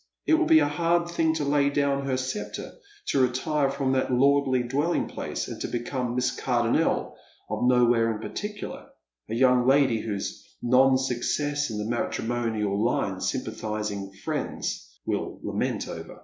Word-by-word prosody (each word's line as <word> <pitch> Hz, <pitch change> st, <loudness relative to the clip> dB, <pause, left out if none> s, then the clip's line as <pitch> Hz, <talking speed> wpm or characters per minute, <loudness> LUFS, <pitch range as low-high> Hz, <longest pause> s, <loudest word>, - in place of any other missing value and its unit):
It -, -, +3 dB
will 325 Hz, 0 st, +4 dB
be 160 Hz, -, +7 dB
a 150 Hz, -2 st, +4 dB
hard 170 Hz, +3 st, +1 dB
thing, 160 Hz, -2 st, +1 dB
to 150 Hz, -, -1 dB
lay 140 Hz, 0 st, +3 dB
down 140 Hz, -1 st, 0 dB
her 130 Hz, -, +1 dB
Bccptre, 130 Hz, +10 st, -4 dB, 0.4 s
to 135 Hz, -, +3 dB
retire 135 Hz, +3 st, +1 dB
from 135 Hz, -1 st, -1 dB
that 130 Hz, 0 st, +1 dB
lordly 135 Hz, 0 st, +3 dB
dwelling 145 Hz, +8 st, 0 dB
place, -, -, -4 dB
and -, -, -7 dB
to -, -, -1 dB
become 120 Hz, 0 st, -3 dB
Miss 125 Hz, 0 st, 0 dB
Cardonnel 120 Hz, +5 st, +1 dB, 0.4 s
of -, -, -1 dB
nowhere 120 Hz, -2 st, +4 dB
in 110 Hz, -, -4 dB
particular, 210 Hz, -, -6 dB, 0.4 s
a 110 Hz, -, -2 dB
young 125 Hz, 0 st, +4 dB
lady 135 Hz, -4 st, +4 dB
whose 100 Hz, -3 st, -4 dB, 0.2 s
non 130 Hz, +2 st, +4 dB
success 145 Hz, +3 st, -1 dB
in 110 Hz, -, -4 dB
the 105 Hz, -, -2 dB
matrimonial 110 Hz, -3 st, -1 dB
line 120 Hz, -, 0 dB
sympatliising 105 Hz, -2 st, -3 dB
friends -, -, -3 dB
will -, -, -3 dB
lament -, -, -2 dB
over. -, -, -8 dB
130 Hz, 155 wpm, -26 LUFS, 120-145 Hz, 0.4 s, be